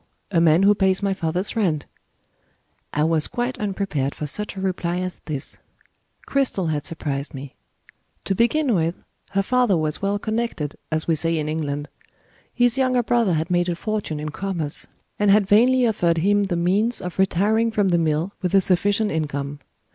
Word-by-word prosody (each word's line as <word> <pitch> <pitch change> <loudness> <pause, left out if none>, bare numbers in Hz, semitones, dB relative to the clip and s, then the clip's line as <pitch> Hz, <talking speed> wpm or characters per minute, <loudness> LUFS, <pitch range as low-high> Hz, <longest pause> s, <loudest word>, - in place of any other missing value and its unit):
A 170 -3 +3
man 165 +2 +5
who 205 +1 +6
pays 190 -1 +1
my 195 -1 +1
father's 180 +1 -2
rent." 170 -10 0 1.1
I 150 - 0
was 160 -1 +2
quite 245 +1 -3
unprepared 190 -9 -2
for 150 - -4
such 210 +8 -1
a - - -6
reply 180 -2 -1
as 185 0 -3
this: 145 -4 -3 0.7
Cristel 245 -11 0
had 150 -1 -2
surprised 145 -2 -4
me. 135 0 -8 0.7
To 195 - 0
begin 240 +6 +2
with, 170 -2 +1 0.4
her 195 0 +2
father 245 -4 +2
was 155 -1 -1
"well 200 +1 0
connected," 215 -9 -3 0.2
as 155 0 -1
we 165 - +3
say 165 +1 +1
in 150 -1 -2
England. 145 -2 -3 0.6
His 245 +1 +2
younger 255 -2 +2
brother 230 -5 +2
had 160 +3 -1
made 175 0 +2
a 175 - -1
fortune 205 -5 -3
in 150 +1 -4
commerce, 165 -3 -3 0.3
and 205 -1 +3
had 205 0 +5
vainly 245 +6 +4
offered 175 -7 +1
him 200 +4 +2
the 185 -3 -2
means 200 +7 +1
of 180 0 -7
retiring 205 +5 +2
from 205 -3 +1
the 170 -1 +3
mill 160 +3 0
with 180 0 0
a 195 - +6
sufficient 200 +3 +2
income. 145 -3 -3
185 Hz, 180 wpm, -22 LUFS, 160-210 Hz, 1.1 s, who